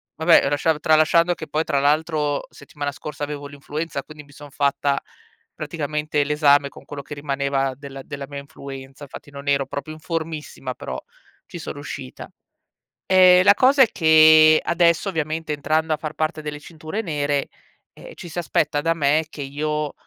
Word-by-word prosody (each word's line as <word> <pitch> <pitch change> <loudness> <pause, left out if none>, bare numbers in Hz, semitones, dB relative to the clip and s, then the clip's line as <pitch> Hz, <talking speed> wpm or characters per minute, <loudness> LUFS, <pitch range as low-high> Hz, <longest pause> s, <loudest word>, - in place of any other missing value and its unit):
vabbè, 160 -3 +4
lasciato 150 +2 +1
tralasciando 160 +3 +3
che 155 - -8
poi, 155 +1 -1
tra 140 - +1
l'altro, 150 0 0
settimana 145 0 -6
scorsa 145 +1 -7
avevo 145 -1 -5
l'influenza, 145 +1 -5
quindi 155 -1 -12
mi 145 - -20
son 145 +1 -12
fatta 140 0 0 0.6
praticamente 150 -1 -2
l'esame 145 -1 +3
con - - -15
quello 145 -1 -7
che - - -9
rimaneva 140 -1 -1
della 135 0 -9
della 140 0 -7
mia 140 -1 -6
influenza. 135 0 -10
Infatti, 140 - -12
non 140 0 -10
ero 140 -1 +2
proprio 140 +3 -6
in - - -14
formissima, 160 -5 -5
però 65 - -6 0.5
ci - - -9
so - - -6
riuscita. 65 - -8 0.8
Ehm, 185 -1 +7
la 200 +1 +7
cosa 265 +3 +5
è - - +3
che 155 -1 +6
adesso, 170 +2 +2
ovviamente, 160 -2 -3
entrando 155 +2 0
a - - -1
far 155 -1 -6
parte 155 0 -2
delle 150 -1 -6
cinture 160 +6 -6
nere, 145 -6 -1 0.4
ehm, - - -12
ci 175 - -10
si 165 - -10
aspetta 150 -3 0
da 165 +2 +1
me 155 +1 +2
che 150 - -9
io, 150 +1 -3
150 Hz, 170 wpm, -22 LUFS, 140-160 Hz, 0.8 s, Ehm